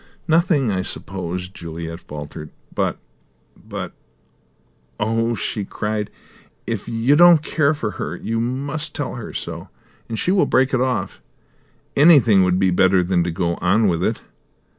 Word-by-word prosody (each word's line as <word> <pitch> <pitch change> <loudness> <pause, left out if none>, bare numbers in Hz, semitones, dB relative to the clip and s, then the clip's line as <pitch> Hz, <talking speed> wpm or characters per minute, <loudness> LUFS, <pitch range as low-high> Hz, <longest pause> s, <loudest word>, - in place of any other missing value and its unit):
"Nothing, 160 - +3
I 95 -1 0
suppose," 90 -1 -3
Juliet 85 -2 -7
faltered. 75 -1 -8 0.2
"But - - -1 0.6
but - - -7 1.1
Oh," 115 +2 0
she 105 0 -3
cried, 105 +1 -3 0.6
"if - - -4
you 115 +5 +2
don't 170 -1 +7
care 155 -1 +1
for 115 -8 -3
her, - - -5
you 115 0 -3
must 140 +5 -3
tell 145 -3 -3
her 120 -3 -7
so, - - -6 0.4
and 115 - -3
she 180 - 0
will 195 0 +3
break 130 +1 +2
it 130 - +2
off. 130 -1 -2 0.7
Anything 140 - +6
would 90 0 +2
be 95 -1 +2
better 95 0 +4
than 90 -1 +1
to - - -1
go 85 0 -1
on 100 +5 +2
with 85 -3 0
it!" - - -1
110 Hz, 150 wpm, -21 LUFS, 90-140 Hz, 1.1 s, don't